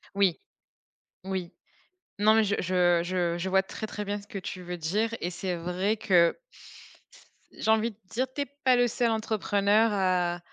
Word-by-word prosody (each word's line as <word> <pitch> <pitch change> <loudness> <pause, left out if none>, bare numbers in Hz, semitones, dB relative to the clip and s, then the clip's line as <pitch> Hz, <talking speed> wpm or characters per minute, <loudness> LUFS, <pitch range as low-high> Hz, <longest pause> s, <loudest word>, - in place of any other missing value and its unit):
Oui, 195 -4 +2 0.8
oui. 190 -3 -4 0.7
Non, 215 +1 +5
mais 220 - +5
j 200 -1 0
je 175 -1 +2
je 175 -1 -1
je 185 +2 -3
vois 190 0 +3
très, 220 +3 -6
très 210 0 -5
bien 205 +1 -2
ce 200 - -18
que 200 - -7
tu 185 -1 -7
veux 180 0 -5
dire 205 +8 -1
et 175 - -1
c'est 180 +1 -3
vrai 180 +5 -1
que 175 -5 +3 1.2
j'ai 220 - +1
envie 220 +1 +2
de 205 - -23
dire, 255 +5 -1
tu 285 - -3
es - - 0 0.2
pas 255 -1 +5
le 245 0 +3
seul 235 0 0
entrepreneur 215 0 +2
à 180 -3 +1
195 Hz, 180 wpm, -28 LUFS, 180-220 Hz, 1.2 s, Non